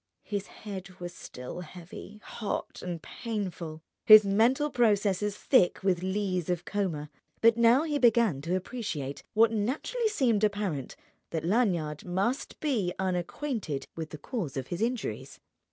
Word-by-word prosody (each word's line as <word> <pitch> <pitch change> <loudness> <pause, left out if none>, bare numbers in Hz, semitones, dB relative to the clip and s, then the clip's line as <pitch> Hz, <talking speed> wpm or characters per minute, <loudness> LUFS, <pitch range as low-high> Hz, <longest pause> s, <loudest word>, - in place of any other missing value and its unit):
His 200 -2 -3
head 190 -3 -9
was 175 0 -6
still 125 -1 -8
heavy, 180 +4 -10
hot, 215 - -4
and 175 -3 -5
painful, 185 -8 -5 0.2
his 215 -1 +10
mental 240 +9 +3
processes 210 -3 +2
thick 190 -11 +3
with 185 -3 +2
lees 185 -2 -1
of 175 -1 -1
coma; 165 -8 -2 0.3
but 230 0 +6
now 235 +4 +5
he 300 -3 -1
began 230 - +4
to 170 +5 -1
appreciate, 170 - -4
what 225 +1 +5
naturally 285 - -1
seemed 240 - +2
apparent, 200 -9 -1 0.3
that 160 -1 -3
Lanyard 175 -8 +1
must 195 +9 -2
be 235 - 0
unacquainted 185 - -2
with 160 -1 -5
the 155 - -8
cause 165 - -4
of 130 -1 -4
his 175 +3 -3
injuries. 240 0 -3
200 Hz, 140 wpm, -29 LUFS, 175-230 Hz, 0.3 s, his